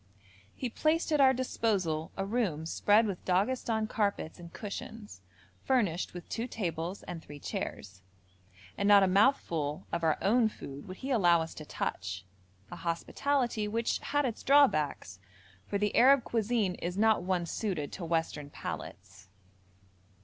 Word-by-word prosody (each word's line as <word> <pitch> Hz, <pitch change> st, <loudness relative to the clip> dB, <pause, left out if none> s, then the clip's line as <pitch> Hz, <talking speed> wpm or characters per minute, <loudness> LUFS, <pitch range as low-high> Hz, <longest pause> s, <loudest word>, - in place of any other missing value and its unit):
He 255 Hz, -, -3 dB
placed 315 Hz, +7 st, 0 dB
at 300 Hz, -2 st, +4 dB
our 265 Hz, -1 st, +7 dB
disposal 200 Hz, -11 st, -1 dB
a 195 Hz, -, -1 dB
room 195 Hz, -8 st, -1 dB
spread 210 Hz, +6 st, +3 dB
with 195 Hz, -4 st, -4 dB
Daghestan 220 Hz, +4 st, +1 dB
carpets 200 Hz, -6 st, -1 dB
and 170 Hz, -1 st, -10 dB
cushions, 210 Hz, +2 st, -8 dB, 0.4 s
furnished 205 Hz, -11 st, 0 dB
with 175 Hz, -, -8 dB
two 230 Hz, +2 st, -3 dB
tables 175 Hz, -4 st, -4 dB
and 175 Hz, -2 st, -7 dB
three 145 Hz, -1 st, -11 dB
chairs, 100 Hz, -7 st, -5 dB, 0.8 s
and 200 Hz, -, +1 dB
not 205 Hz, -1 st, +8 dB
a -, -, +4 dB
mouthful 175 Hz, -, +2 dB
of 170 Hz, 0 st, -2 dB
our 160 Hz, -2 st, +3 dB
own 225 Hz, +2 st, +3 dB
food 140 Hz, -8 st, -9 dB
would 185 Hz, 0 st, -8 dB
he 275 Hz, -, -2 dB
allow 175 Hz, -8 st, +5 dB
us 160 Hz, -, -8 dB
to 155 Hz, -, -9 dB
touch, 95 Hz, -8 st, -4 dB, 0.5 s
a -, -, -6 dB
hospitality 230 Hz, +6 st, -1 dB
which 225 Hz, +2 st, -1 dB
had 290 Hz, 0 st, 0 dB
its 235 Hz, -3 st, -3 dB
drawbacks, 155 Hz, -, +3 dB, 0.5 s
for 200 Hz, -, -1 dB
the 210 Hz, 0 st, 0 dB
Arab 265 Hz, +1 st, +6 dB
cuisine 225 Hz, -4 st, 0 dB
is 175 Hz, +2 st, -3 dB
not 220 Hz, -1 st, +4 dB
one 180 Hz, -1 st, 0 dB
suited 170 Hz, -5 st, -3 dB
to 185 Hz, -, -7 dB
Western 165 Hz, -3 st, -2 dB
palates. 95 Hz, -7 st, -8 dB
200 Hz, 150 wpm, -31 LUFS, 165-230 Hz, 0.8 s, not